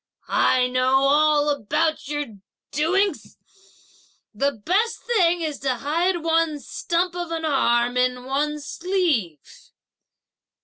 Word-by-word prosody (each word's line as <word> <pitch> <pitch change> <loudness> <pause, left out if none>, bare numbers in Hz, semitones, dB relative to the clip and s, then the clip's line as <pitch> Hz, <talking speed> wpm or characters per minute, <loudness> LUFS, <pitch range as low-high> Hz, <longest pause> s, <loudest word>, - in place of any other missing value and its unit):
I 255 -1 +3
know 255 +1 +2
all 295 +1 +3
about 290 +4 -1
your 295 0 -2 0.5
doings; 375 +7 0 1.0
the 280 +7 0
best 375 - -1
thing 355 -7 +2
is 305 -3 -3
to 265 -2 -1
hide 335 +7 -1
one's 325 -3 0
stump 350 0 -1
of 350 -1 -4
an 325 -1 -3
arm 245 -4 +1
in 250 0 0
one's 295 +2 -2
sleeve!" 330 - -1
300 Hz, 115 wpm, -23 LUFS, 260-340 Hz, 1.0 s, I